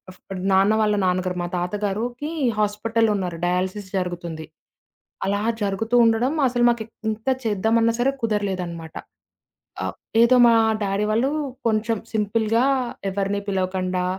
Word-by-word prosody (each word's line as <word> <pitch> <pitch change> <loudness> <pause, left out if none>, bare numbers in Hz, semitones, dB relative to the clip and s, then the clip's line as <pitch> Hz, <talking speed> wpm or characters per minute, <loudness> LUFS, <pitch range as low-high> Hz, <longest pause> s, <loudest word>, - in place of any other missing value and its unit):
ఫ్ - - -25 0.2
డ్ 180 - -6
నాన్న 195 +3 +4
వాళ్ళ 210 -1 +2
నాన్నగారు. 180 0 0
మా - - -2
తాతగారుకి 210 - -2 0.3
హాస్పిటల్ 220 +2 +1
ఉన్నారు. 180 -4 -3
డయాలసిస్ 185 +2 -1
జరుగుతుంది. 170 -3 -4 0.8
అలా 200 +1 0 0.2
జరుగుతూ 215 +4 -1
ఉండడం 230 +5 +2
అసలు 245 -1 0
మాకు 235 -1 0
ఎ - - -20 0.2
ఎంత 220 +3 -5 0.2
చేద్దామన్నా 225 +2 +2
సరే, 270 +3 +3
కుదరలేదనమాట. 185 -7 -3 0.9
ఆహ్, - - -3 0.3
ఏదో 255 +2 +5
మా 235 - +6 0.3
డ్యాడీ 200 +1 0
వాళ్ళు 240 +5 +2 0.4
కొంచెం 220 0 +1 0.2
సింపుల్‌గా 220 +2 +1 0.5
ఎవరిని 200 +1 -1
పిలవకుండా, 185 -1 -1
205 Hz, 125 wpm, -23 LUFS, 185-225 Hz, 0.9 s, మా